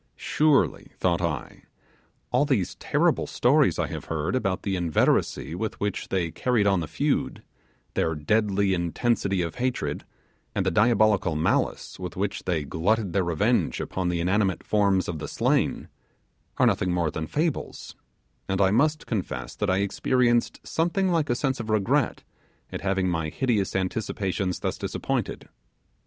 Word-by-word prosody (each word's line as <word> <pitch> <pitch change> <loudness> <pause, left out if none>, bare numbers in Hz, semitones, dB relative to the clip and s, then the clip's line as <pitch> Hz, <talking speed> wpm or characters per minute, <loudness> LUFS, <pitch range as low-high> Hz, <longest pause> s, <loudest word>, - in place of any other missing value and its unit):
Surely, 145 - +1
thought 90 -1 +1
I, 75 -8 -3 0.7
all 125 +3 +3
these 130 - 0
terrible - - +1
stories - - +3
I - - +1
have - - -6
heard 80 +7 -2
about 95 -7 -1
the 100 -2 -1
inveteracy 85 -2 +1
with 110 +5 -4
which 100 -2 -2
they 85 -4 -1
carried 120 -1 +1
on 100 -2 +3
the 80 - -3
feud, - - -1 0.5
their 80 0 0
deadly 100 +4 +1
intensity, 95 +2 0
of 85 - -5
hatred 130 0 -1 0.5
and 95 - 0
the 95 - +2
diabolical 105 -4 +3
malice 80 +4 0
with 90 -1 -6
which 100 +1 -3
they 85 -4 0
glutted 95 +6 0
their 95 -1 +2
revenge 85 -3 +1
upon 95 -1 -2
the 85 -1 -1
inanimate 95 +2 +1
forms 100 -3 +2
of 80 -3 -4
the - - -5
slain, - - 0 0.7
are - - +4
nothing 90 - +2
more 85 -3 0
than 80 0 -4
fables, 155 - -3 0.5
and 95 0 0
I 95 -1 +4
must 150 +7 +2
confess 105 -6 -4
that - - 0
I 95 +1 +2
experienced 120 +4 +1
something 175 +4 0
like 165 -3 +1
a 120 - +2
sense 135 0 -1
of 115 -1 -5
regret 110 +6 +1 0.5
at - - -5
having 95 -1 0
my 80 -3 -1
hideous 110 -2 0
anticipations 95 -1 -2
thus - - -2
disappointed. - - -3
95 Hz, 155 wpm, -26 LUFS, 90-115 Hz, 0.7 s, are